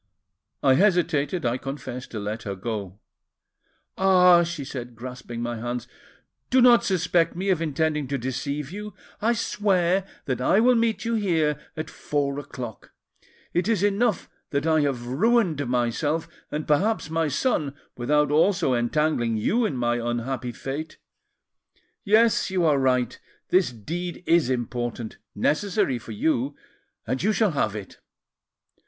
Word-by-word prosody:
I 135 -2 +6
hesitated, 170 -3 +2
I 120 +2 0
confess, 130 -2 -6
to 110 - -6
let 105 +2 -4
her 100 -1 -4
go. 100 -2 -5 1.0
'Ah,' 180 -2 +6
she 170 -4 -3
said, 125 -3 -7
grasping 120 -1 -7
my 120 -1 -3
hands, 120 +1 -4 0.6
'do 260 - +4
not 245 -1 +7
suspect 175 -3 +1
me 190 +3 -2
of 175 -3 +1
intending 155 -2 0
to 140 +1 -1
deceive 135 +4 -3
you! 210 +2 -7 0.3
I 230 +3 +3
swear 195 -4 +1 0.2
that 130 -4 -2
I 190 +10 +4
will 250 +3 +5
meet 230 -1 +1
you 230 - 0
here 165 -9 +1 0.2
at 155 0 -3
four 145 -1 -2
o'clock. 125 -5 -8 0.6
It 175 +3 +1
is 220 -4 +1
enough 205 +1 +1 0.2
that 140 +1 -1
I 160 -1 +3
have 135 -4 -1
ruined 165 - +2
myself, 135 +7 0 0.2
and 150 +1 -4
perhaps 180 +3 +1
my 160 -1 +1
son, 145 - 0 0.2
without 145 +4 +1
also 160 -2 +3
entangling 120 -1 +1
you 225 - +1
in 135 - -4
my 120 0 +1
unhappy 120 +2 -2
fate. 140 +6 -6 1.1
Yes, 220 +2 +4
you 185 -2 +1
are 145 -3 +4
right; 125 -2 +1 0.3
this 185 -6 +3
deed 170 - -5
is 165 -6 +3
important, 120 -2 -3 0.2
necessary 155 - +1
for 115 - -10
you, 135 +4 0 0.5
and 130 +3 -2
you 210 - +2
shall 215 -2 +2
have 110 -8 0
it. 100 -3 -8
150 Hz, 145 wpm, -25 LUFS, 125-180 Hz, 1.1 s, not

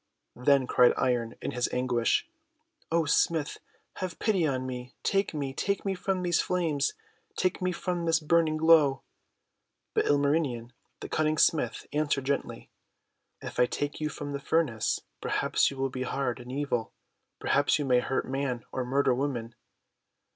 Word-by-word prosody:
Then 140 -2 +5
cried 125 -1 +4
Iron 120 -2 0
in - - -2
his 125 0 -1
anguish: 125 - +1 0.3
— 310 - -40
;<O 165 -1 +2
Smith, 155 0 +1 0.4
have 185 -3 -4
pity 190 -7 +1
on 130 -2 -1
me! 125 -1 -6
Take 195 0 +1
me, 140 -4 -3
take 200 +9 -1
me 195 - +1
from 185 0 -2
these 175 -1 +2
flames! 160 -6 0 0.4
Take 185 +1 0
me 185 0 +1
from 175 -1 -3
this 165 0 +3
burn 165 +1 +3
ing 155 0 -1
glow!' 155 -4 +5 0.9
But - - +2
Ilmarmen 140 -5 +1 0.3
the - - -5
Cunning 155 0 +1
Smith 155 - +2
answered 145 -3 0
gently: 140 0 -3 0.4
— - - -52
"If - - -6
I 125 - +5
take 145 +4 -3
you 155 - 0
from 145 -1 -6
the 140 - -3
furnace, 140 -7 0 0.2
perhaps - - +1
you 140 - -9
will 135 0 -1
be 130 - -5
hard 130 -1 -2
and 125 +1 -9
evil; 130 -5 -2 0.4
perhaps 145 +1 +2
you 145 - -2
may 125 -2 +4
hurt 130 +2 -2
man 130 -3 -2
or 130 - -2
murder 135 +1 +2
woman." 125 -3 -2
145 Hz, 170 wpm, -28 LUFS, 130-165 Hz, 0.9 s, Then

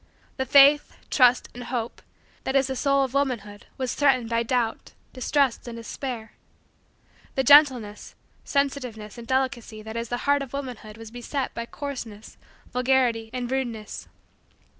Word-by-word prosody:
The 265 -1 -2
faith, 285 +3 +6 0.2
trust, 250 -2 +4
and 245 0 -8
hope, 240 -2 -4 0.4
that 265 - -2
is 270 0 +4
the 265 0 -3
soul 275 +1 +2
of 265 -1 -3
womanhood 235 -8 -2
was 255 -2 -2
threatened 255 -5 +2
by 230 0 +2
doubt, 235 -1 -1 0.2
distrust, 265 -1 0
and 235 - -6
despair. 230 0 -6 1.0
The 265 - +2
gentleness, 260 -7 +5 0.3
sensitiveness, 250 -7 -2
and 230 - -10
delicacy, 245 -4 -1
that 220 +1 -8
is 230 0 -3
the 245 0 -3
heart 285 0 +3
of 275 -2 -7
womanhood 245 -6 -6
was 225 -1 -10
beset 250 +3 -4
by 235 0 -5
coarseness, 240 -8 -7 0.4
vulgarity, 250 -3 +2
and 250 0 -4
rudeness. 235 -5 -4
250 Hz, 145 wpm, -25 LUFS, 230-270 Hz, 1.0 s, faith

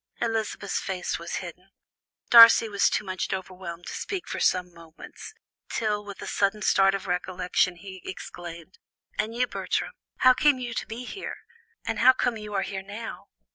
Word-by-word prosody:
Elizabeth's 220 -3 -2
face 185 -4 -3
was 170 0 -5
hidden. 180 +2 -11 0.6
Darcy 230 -1 +10
was 200 -2 +2
too - - -1
much 185 -2 -3
overwhelmed 185 -2 -6
to - - -6
speak 380 -4 -4
for - - -4
some 180 -1 +1
moments, 165 -1 -12 0.3
till 210 -2 -1
with 200 -1 -9
a - - -6
sudden 205 +1 0
start 195 0 +4
of 195 +1 -5
recollection 180 0 0
he 190 +1 -10
exclaimed: 175 -1 -9 0.4
"And 220 +2 -1
you, 250 +1 +2
Bertram? - - -2 0.3
how 255 0 +8
came 290 +1 +3
you 245 -2 -5
to - - -4
be 235 +3 -6
there? 390 - -6 0.5
and - - -2
how 260 - +7
come 245 -2 0
you 210 -1 -8
are 195 - +1
here 195 -1 -5
now?" 205 +4 -8
195 Hz, 175 wpm, -26 LUFS, 180-225 Hz, 0.6 s, Darcy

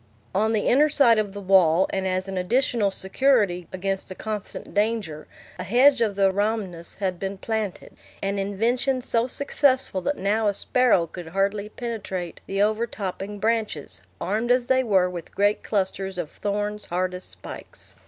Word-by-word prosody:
On 215 +3 +2
the 215 -2 0
inner 295 +4 +5
side 245 -7 +5
of 205 -2 -1
the 205 - -7
wall, 185 -2 +4
and 190 0 -1
as 185 +1 -1
an 195 - -5
additional 220 +2 +1
security 195 -3 +1
against 195 +1 -3
the 185 - -6
constant 215 0 -6
danger, 205 -8 -1 0.3
a - - -3
hedge 255 +4 +5
of 215 -3 +1
the 195 -1 +3
rhamnus 200 -4 -2
had 185 -3 -2
been 195 0 -4
planted, 215 -2 -4 0.3
an 200 0 -2
invention 240 +6 0
so 230 0 +1
successful 260 -6 +1
that 285 +9 -1
now 210 +3 +1
a 200 - +1
sparrow 245 -9 +3
could 170 +1 -9
hardly 200 +4 -1
penetrate 195 -7 -5
the 195 +1 +1
overtopping 210 -2 -2
branches, 215 - -1 0.2
armed 215 +6 -1
as 250 0 +3
they 260 0 +3
were 190 -6 +3
with 175 -2 -8
great 205 +1 +2
clusters 190 -2 -2
of 170 -4 -4
thorns 205 +1 -3
hard 180 +1 -1
as 180 0 -7
spikes. - - -11
205 Hz, 165 wpm, -24 LUFS, 190-230 Hz, 0.3 s, inner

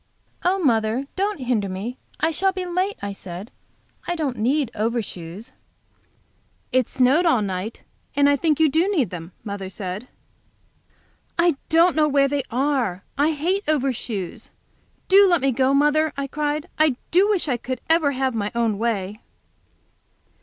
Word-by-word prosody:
"Oh, 370 +2 +2
mother, 235 - +1
don't 395 -4 -1
hinder 235 -6 0
me! 205 +7 -5 0.2
I 320 - +2
shall 385 +5 +2
be 375 -1 -4
late," 365 +3 -1
I 200 - -2
said. 190 +2 -8 0.6
"I 350 - 0
don't 290 -7 -2
need 260 +2 +1
overshoes." 210 -3 -4 1.2
"It 255 -2 +2
snowed 270 +8 +3
all 250 -10 +3
night, 195 +3 -4 0.3
and 285 0 +4
I 285 - +5
think 305 0 +1
you 320 - +6
do 325 +6 +2
need 305 - +1
them," 170 -1 -7
mother 200 -2 -5
said. 190 +4 -6 1.3
"I 340 -2 +3
don't 335 +2 +4
know 305 -1 +4
where 280 -1 +3
they 285 0 0
are. 250 -8 0
I 295 +3 +2
hate 360 +7 0
overshoes. 250 - -2 0.6
Do 395 +1 +7
let 350 -3 +4
me 275 -1 +1
go, 260 +2 +2
mother," 295 +2 +3
I 280 - -1
cried. 295 +2 -2
"I 310 -4 +4 0.2
do 380 +4 +4
wish 390 -6 +1
I 250 -4 +1
could 255 +2 -5
ever 320 -3 +3
have 260 -1 0
my 210 -2 -2
own 225 -3 +1
way." 215 -2 -2
275 Hz, 160 wpm, -23 LUFS, 220-315 Hz, 1.3 s, Do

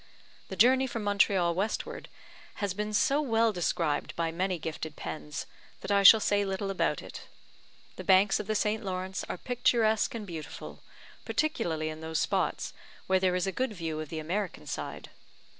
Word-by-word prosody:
The 190 - -5
journey 260 +7 +5
from 230 -3 -4
Montreal 195 -4 +3
westward 195 +5 -3 0.5
has 200 -3 -2
been 210 +2 -3
so 275 +7 +3
well 225 -5 +2
described 165 -4 -1
by 165 -1 -1
many 180 +2 -1
gifted 160 -1 -5
pens, 150 -1 -6 0.4
that - - -4
I 200 0 +4
shall 220 +3 +10
say 205 -1 +2
little 195 0 -2
about 195 - 0
it. - - -10 0.7
The - - -6
banks 195 +1 +4
of 210 - -5
the 215 - 0
St. 215 +1 0
Lawrence 185 0 -3
are - - -3
picturesque 230 -1 +1
and 220 -2 -5
beautiful, 165 -5 -8 0.4
particularly 165 - -1
in 155 0 -7
those 160 0 -3
spots - - 0 0.3
where 190 0 +3
there 185 -1 +2
is 180 - 0
a 195 - -1
good 255 +2 -2
view 165 -4 -4
of 155 -2 -5
the 160 - -5
American 180 +5 -3
side. - - -6
195 Hz, 175 wpm, -29 LUFS, 170-215 Hz, 0.7 s, shall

